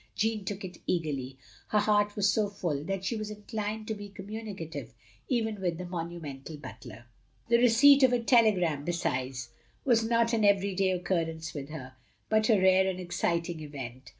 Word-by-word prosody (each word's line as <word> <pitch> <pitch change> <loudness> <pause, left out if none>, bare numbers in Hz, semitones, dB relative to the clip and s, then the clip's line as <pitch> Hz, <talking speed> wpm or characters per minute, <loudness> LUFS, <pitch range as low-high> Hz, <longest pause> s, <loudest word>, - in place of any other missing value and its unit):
Jeanne 220 -1 0
took 195 0 -4
it 180 -2 -9
eagerly. 140 -6 -2 0.3
Her 215 - +1
heart 205 0 +2
was 205 -1 +3
so 215 -1 +2
ftill 170 -7 -3
that 195 -1 -2
she 210 - -1
was 215 -1 -4
inclined 215 0 -5
to 220 - -1
be 205 -1 -8
communicative 195 - -7 0.3
even 220 -5 -1
with 175 -3 -1
the 180 - -5
moniunental 165 -4 -6
butler. 120 - -10 0.4
The 235 0 +5
receipt 265 +4 +7
of 260 -2 +6
a 245 - +2
telegram, 205 - +3
besides, 130 -7 -2 0.4
was 235 -4 +4
not 230 +1 +2
an 225 -2 +2
every 200 -1 +3
day 190 0 +2
occurrence 165 -3 -2
with 145 -1 -6
her, 130 -4 -8 0.3
but 220 +1 +3
a 215 -3 +5
rare 190 0 +5
and 185 -1 -4
exciting 170 -1 -1
event. 135 -4 -8
190 Hz, 175 wpm, -29 LUFS, 160-215 Hz, 0.4 s, receipt